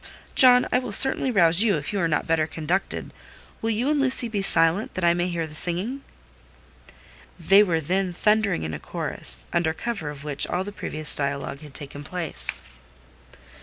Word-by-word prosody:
"John, 250 -1 +6
I 250 - +2
will 250 -4 -7
certainly 265 +3 +5
rouse 175 -5 +3
you 215 -7 +2
if 145 +6 -6
you 200 - -2
are 170 - 0
not 150 -2 -1
better 160 -1 0
conducted. 165 +5 -4 0.5
Will 225 - -2
you 225 +4 -1
and 295 -2 0
Lucy 255 -2 +4
be 210 -3 -3
silent, 165 +2 +2
that 185 - -4
I 170 0 +4
may 175 +1 -2
hear 170 -2 -3
the 155 - -11
singing?" 185 - 0 1.4
They 195 +5 +5
were 175 -6 +1
then 185 +4 -2
thundering 210 - 0
in 80 0 -5
a 75 - -6
chorus, - - 0
under 160 -2 0
cover 220 -11 -5
of 145 -1 -10
which 145 -1 -2
all 180 - -2
the 205 - -8
previous 155 -6 -1
dialogue 140 -1 -4
had 150 -3 -14
taken 145 0 -6
place. 175 +2 -3
175 Hz, 185 wpm, -23 LUFS, 155-210 Hz, 1.4 s, John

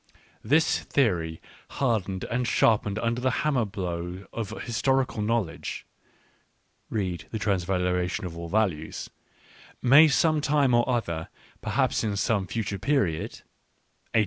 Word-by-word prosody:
This 160 +3 +3
theory, 85 - 0 0.4
hardened 105 -8 0
and 125 +1 -1
sharpened 105 -3 +2
under 115 +2 -1
the 130 - +2 0.2
hammer 135 -6 +2
blow 90 -2 -5
of 115 -4 -5
historical 130 0 0
knowledge 105 -6 -2 1.0
"(read 90 -6 -3
The 110 - -3
Transvaluation 90 -2 0
of 85 -2 -6
all 85 0 -6
Values), 95 -7 -1 0.3
" - - -25 0.3
may 145 +6 +8
some 155 +1 +3
time 145 -3 +2
or 120 +2 +3
other, 85 -10 -1 0.3
perhaps - - +1
in 105 -2 -1
some 100 -3 +1
future 100 -2 -3
period, 100 - 0
— - - -10
1890! - - +7
105 Hz, 130 wpm, -26 LUFS, 90-125 Hz, 1.0 s, may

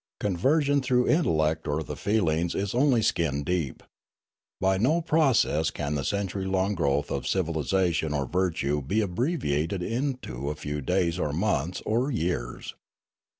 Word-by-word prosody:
Conversion 140 - +2
through 125 -1 +2
the - - +3
intel 155 - +2
lect 80 +1 0
or 75 +2 -1
the - - -6
feelings 85 -5 0
is 100 0 -2
only 125 -2 +3
skin 75 -7 0
deep. 85 -6 -2 0.8
By 95 0 +2
no 125 +9 +3
known 170 - 0
process 135 - +2
can 75 0 -3
the 70 -2 -1
century 100 0 -2
long 95 +1 +1
growth 70 -5 0
of - - -2
civilisation 85 -2 0
or 70 -2 -1
virtue 80 -3 0
be 95 +11 0
abbreviated 90 - -1
into 115 - -3
a 75 - -3
few 75 0 -4
days 90 +2 0
or 75 -4 -1
months 90 -2 -1
or 120 +5 +1
years. 80 - -3
90 Hz, 155 wpm, -27 LUFS, 75-110 Hz, 0.8 s, the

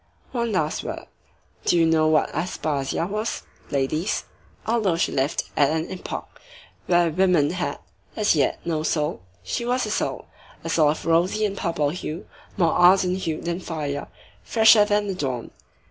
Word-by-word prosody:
One 235 -2 -1
last 155 -6 -1
word. - - -6 0.6
Do - - +3
you 165 - +4
know 160 -1 +3
what 155 -1 +2
Aspasia 155 -4 -2
was, 215 +4 -3 0.3
ladies? 155 +7 -1 0.4
Although 220 -6 +1
she 170 - 0
lived 135 +2 0
at 145 -2 +4
an 160 +2 -2
epoch 185 - -7 0.5
when 175 -3 +3
women 180 -6 +3
had, 180 0 -3 0.4
as 210 -5 +2
yet, 140 -3 +1
no 160 -2 -1
soul, 150 - -1 0.2
she - - -3
was 250 +2 0
a - - -4
soul; - - -2 0.4
a - - -4
soul 155 -3 +4
of 150 - -2
a - - -1
rosy 180 +6 +2
and 200 -1 -2
purple 160 -6 -1
hue, 165 -1 -6 0.3
more 170 -4 +3
ardent 185 +1 +4
hued 160 -3 -3
than 170 +1 -2
fire, 150 -5 -4 0.3
fresher 220 -2 +6
than 210 0 +1
the 195 - -1
dawn. 130 -9 -4
170 Hz, 165 wpm, -24 LUFS, 155-190 Hz, 0.6 s, fresher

